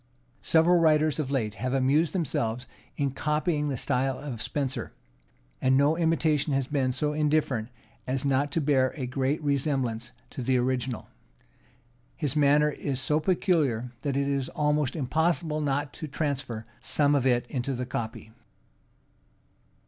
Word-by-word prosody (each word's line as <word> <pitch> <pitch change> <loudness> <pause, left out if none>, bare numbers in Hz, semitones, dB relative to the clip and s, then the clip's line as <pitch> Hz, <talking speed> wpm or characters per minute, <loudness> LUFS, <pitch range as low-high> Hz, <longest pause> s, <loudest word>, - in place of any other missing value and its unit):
Several 170 +2 +4
writers 155 -2 +3
of 145 -4 -1
late 115 -7 -1
have 125 +6 -2
amused 140 +5 +3
themselves 125 - -1 0.3
in 140 -2 0
copying 150 +2 0
the 135 - -2
style 130 +3 0
of 130 -7 -6
Spenser; 135 0 -3 0.7
and 130 0 +4
no 145 +3 +4
imitation 160 -3 +1
has 135 -1 +1
been 135 -2 0
so 150 +4 -1
indifferent 150 -6 +1 0.4
as 130 +1 -1
not 140 +1 +1
to 165 - +1
bear 135 -3 +2
a 135 - -3
great 135 +3 -1
resemblance 135 -5 -1 0.2
to - - -6
the 130 +1 +2
original: 125 -1 -1 1.1
his 150 -3 -2
manner 150 +1 +4
is 135 -2 -3
so 150 +3 +1
peculiar 155 - +1
that 140 -2 -1
it 140 0 +1
is 140 -2 -1
almost 150 -3 0
impossible 160 +2 0
not 145 0 -1
to 155 - -6
transfer 135 -6 -3
some 140 +3 +2
of 135 -2 +2
it 120 -1 +2
into 130 +1 -3
the 125 +1 -3
copy. 110 -2 -5
140 Hz, 150 wpm, -27 LUFS, 130-150 Hz, 1.1 s, Several